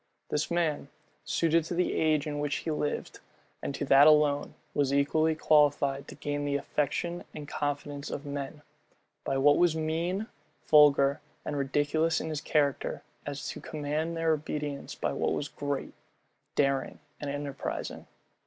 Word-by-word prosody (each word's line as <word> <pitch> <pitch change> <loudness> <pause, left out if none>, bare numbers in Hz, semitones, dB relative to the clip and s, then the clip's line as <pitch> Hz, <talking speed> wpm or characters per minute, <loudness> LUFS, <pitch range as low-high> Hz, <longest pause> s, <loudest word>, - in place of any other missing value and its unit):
This 150 +1 0
man, 165 -5 0 0.4
suited 165 0 +2
to 170 - -3
the 180 +1 +1
age 155 -1 +2
in 145 -1 -3
which 145 -1 -1
he 160 - 0
lived, 150 -1 -3 0.4
and 140 - -3
to - - -2
that 140 +2 +7
alone, 150 -2 +4 0.2
was 140 -2 +1
equally 155 +3 +2
qualified 145 -3 +3
to - - -9
gain 145 0 -3
the 145 0 0
affection 150 +5 -1
and 150 -1 -7
confidence 145 -1 -3
of 145 - -5
men, 145 +1 -5 0.6
by 135 - -1
what 145 +2 +5
was 175 -2 +4
mean, 165 +6 -1 0.4
vulgar, 145 -1 +5 0.2
and 150 - -3
ridiculous 145 +4 +1
in - - -4
his 155 -2 -3
character, 145 -3 0 0.2
as 145 0 -4
to - - -6
command 155 +2 -3
their 165 0 +2
obedience 150 -2 -4
by - - -2
what - - 0
was 145 - -2
great, 145 -1 -4 0.6
daring, 140 -1 +1 0.2
and 145 - -4
enterprising. 140 -1 -4
145 Hz, 155 wpm, -29 LUFS, 145-155 Hz, 0.6 s, that